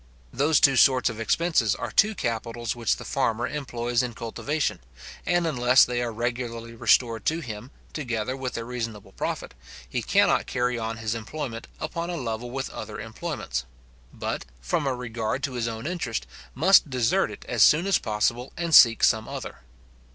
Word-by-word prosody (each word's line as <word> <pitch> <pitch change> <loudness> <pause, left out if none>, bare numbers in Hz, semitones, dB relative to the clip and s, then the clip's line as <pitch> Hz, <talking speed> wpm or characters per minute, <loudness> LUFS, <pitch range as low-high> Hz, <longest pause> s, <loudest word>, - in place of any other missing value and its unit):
Those 145 +4 +3
two 135 -2 +5
sorts 130 -1 +5
of 110 - -9
expenses 130 - +2
are - - -5
two 215 +1 +3
capitals 115 - -3
which 115 -3 +1
the - - -10
farmer 115 +1 0
employs 120 -4 -1
in 125 -2 -4
cultivation; 140 +6 -2 0.5
and 175 -1 +2
unless 125 -4 +5
they 120 0 -2
are 120 -1 -2
regularly 115 0 -4
restored 115 -1 +2
to 160 +2 +1
him, 115 -4 -7 0.2
together 125 -4 -2
with 130 -2 -4
a 115 - -3
reasonable 115 -4 -5
profit, - - -4 0.3
he - - -2
cannot - - +3
carry 125 -1 0
on 115 0 -3
his 110 -1 -2
employment 115 +1 -5
upon 170 +2 -4
a 175 - -3
level 120 -3 -4
with 135 +2 -4
other - - -7
employments; 65 +1 -4 0.5
but, - - -4 0.2
from 65 - -1
a 130 - 0
regard 115 +1 -3
to 135 - -2
his 120 -2 -2
own 115 0 -5
interest, 165 - -3 0.3
must 165 +3 +5
desert 125 -5 +1
it 105 - -10
as 120 -3 0
soon 155 - +6
as 195 -1 +3
possible, 115 +4 -1
and 170 -1 -2
seek 115 -5 +8
some 110 0 +3
other. - - -7
120 Hz, 175 wpm, -26 LUFS, 115-140 Hz, 0.5 s, seek